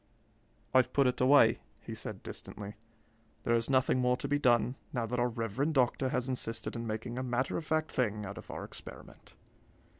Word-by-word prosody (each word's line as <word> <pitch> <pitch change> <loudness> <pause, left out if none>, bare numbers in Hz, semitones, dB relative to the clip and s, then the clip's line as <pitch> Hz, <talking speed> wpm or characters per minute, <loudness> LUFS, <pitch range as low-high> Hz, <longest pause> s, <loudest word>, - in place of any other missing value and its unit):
"I've 130 -1 +4
put 140 - +4
it 125 0 +1
away," 130 -4 +6 0.2
he - - -8
said - - -7
distantly. 105 0 -7 0.7
"There 120 - +2
is 115 +1 +1
nothing 130 -1 +3
more 125 0 +3
to 140 - -4
be 145 +1 +1
done, 120 -3 +3 0.2
now 120 -3 -1
that 125 +2 -2
our 120 0 +2
reverend 120 +7 -1
doctor 130 0 +2
has 125 0 -1
insisted 125 -3 -3
in 115 0 -4
making 115 +3 -3
a - - -2
matter 125 +1 0
of 160 - -3
fact 155 0 0
thing 105 -4 0
out 100 - -6
of - - -13
our - - -5
experiment. - - -11
125 Hz, 190 wpm, -32 LUFS, 115-130 Hz, 0.7 s, away